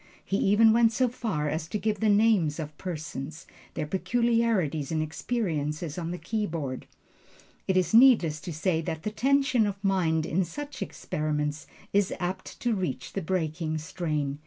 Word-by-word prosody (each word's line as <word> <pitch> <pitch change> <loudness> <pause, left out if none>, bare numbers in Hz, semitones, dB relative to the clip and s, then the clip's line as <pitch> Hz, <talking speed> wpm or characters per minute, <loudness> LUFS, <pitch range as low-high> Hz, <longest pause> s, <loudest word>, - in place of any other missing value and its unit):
He 195 - 0
even 220 +3 +5
went 230 -1 +5
so 250 +2 +2
far 210 -11 -2
as 155 +2 -2
to 195 - -2
give 210 -1 -1
the 220 - +2
names 205 -7 +3
of 155 -1 -5
persons, 155 -3 -6 0.3
their 155 - -2
peculiarities 210 - +1
and 160 - 0
experiences 155 -3 -2
on 170 -2 -4
the 175 - -3
keyboard. 165 - -3 0.8
It 190 - +2
is 180 0 +1
needless 220 - +6
to 175 - -6
say 165 +1 0
that 160 0 -4
the 210 - -2
tension 265 -1 +2
of 200 - -2
mind 170 -5 +2
in 185 +3 +1
such 290 - -7
experiments 150 0 -3 0.3
is 200 -1 +3
apt 185 +1 -4
to 240 -1 +1
reach 185 -4 -3
the 195 - -2
breaking 160 -2 -1
strain. 150 -3 -3
180 Hz, 160 wpm, -27 LUFS, 155-215 Hz, 0.8 s, needless